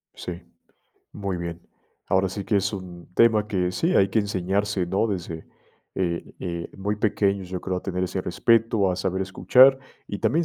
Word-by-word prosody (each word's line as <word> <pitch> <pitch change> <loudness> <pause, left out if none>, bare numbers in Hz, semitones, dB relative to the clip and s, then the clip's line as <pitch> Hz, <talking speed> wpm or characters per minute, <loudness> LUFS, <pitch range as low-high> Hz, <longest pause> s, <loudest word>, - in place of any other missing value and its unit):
Sí, 90 0 -6 0.7
muy 100 -2 -3
bien. 85 0 -5 0.5
Ahora 95 0 +2
sí 100 +1 -5
que 105 - +1
es 100 +1 +1
un 90 -3 -8
tema 110 -1 +4
que 90 -4 0
sí, 170 - 0
hay 95 - +5
que 105 - +1
enseñarse, 100 -1 -1
¿no?, 95 +5 +1
desde, 85 -6 -5 0.5
eh, 85 -2 -2
eh, 85 -1 -4
muy 100 +2 -2
pequeños, 100 -3 0
yo 90 -1 -3
creo, 95 -1 -2
a 90 - -4
tener 90 -1 -2
ese 95 +1 -3
respeto, 110 +1 +2
a 90 - -2
saber 95 0 -1
escuchar, 125 +8 +5 0.3
y 100 - -4
también 150 +11 +2
95 Hz, 180 wpm, -24 LUFS, 90-105 Hz, 0.7 s, hay